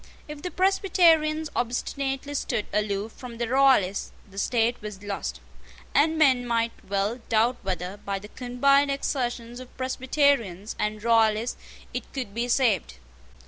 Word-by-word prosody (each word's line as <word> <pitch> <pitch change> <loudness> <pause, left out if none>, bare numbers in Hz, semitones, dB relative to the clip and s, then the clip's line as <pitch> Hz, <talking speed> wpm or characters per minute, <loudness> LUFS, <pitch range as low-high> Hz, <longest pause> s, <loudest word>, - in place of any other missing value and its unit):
If 300 -1 -8
the 360 - -3
Presbyterians 330 -4 +3
obstinately 270 +3 -2
stood 240 -6 -1
aloof 210 +1 -1
from 240 -1 -10
the 235 0 -1
Royalists, 255 -7 +3 0.2
the 195 0 -8
state 235 +2 +1
was 210 -2 -8
lost; 65 - -4 0.5
and 315 +3 +3
men 265 -5 +4
might 230 -1 +1 0.2
well 200 +4 0
doubt 230 +3 +3
whether, 185 0 -3
by 200 -1 -4
the 205 +2 -10
combined 275 +4 +2
exertions 245 -3 -2
of 255 -1 -12
Presbyterians 255 - 0
and 210 0 -2
Royalists, 225 0 +3 0.4
it - - -5
could 250 -7 -4
be 235 +2 -1
saved. 230 - +1
240 Hz, 140 wpm, -26 LUFS, 210-275 Hz, 0.5 s, men